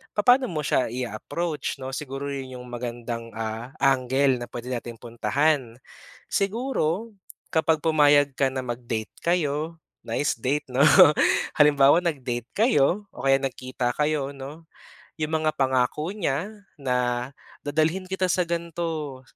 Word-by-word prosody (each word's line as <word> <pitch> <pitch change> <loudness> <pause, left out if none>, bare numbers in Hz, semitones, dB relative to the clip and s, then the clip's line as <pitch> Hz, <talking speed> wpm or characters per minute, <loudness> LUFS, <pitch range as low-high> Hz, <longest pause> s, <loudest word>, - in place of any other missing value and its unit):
papa'no 245 +4 +4
mo 155 -2 -2
siya 130 - +1
i-a-approach 130 +7 -3
'no, 130 0 -6
siguro 135 -1 -5
yun 130 -2 -6
yung 125 - -10
magandang 120 -1 -5
ah 110 +2 -4
angle 135 0 +2
na 120 - -5
pwede 120 +2 -6
nating 120 -1 -5
puntahan. 125 +1 0 0.5
Siguro 220 -2 -1 0.4
kapag 160 -1 +2
pumayag 145 -3 +4
ka 135 - +2
na 130 0 -3
mag-date 120 -2 -4
kayo, 165 -1 0 0.2
nice 145 - 0
date 140 +5 0
'no 130 +3 +3 0.7
halimbawa 145 +1 +6
nag-date 125 -7 -2
kayo 205 - +2
o - - -9
kaya 135 0 +5
nagkita 130 -2 -3
kayo 150 -2 0
'no. 145 +5 -9 0.5
Yung 155 0 -2
mga 155 - +3
pangako 130 +5 +1
niya 165 -3 -1 0.3
na, 125 -2 0 0.4
dadalhin 160 +6 0
kita 190 0 0
sa 180 - +2
gan'to, 165 -5 -3
140 Hz, 130 wpm, -25 LUFS, 125-160 Hz, 0.7 s, halimbawa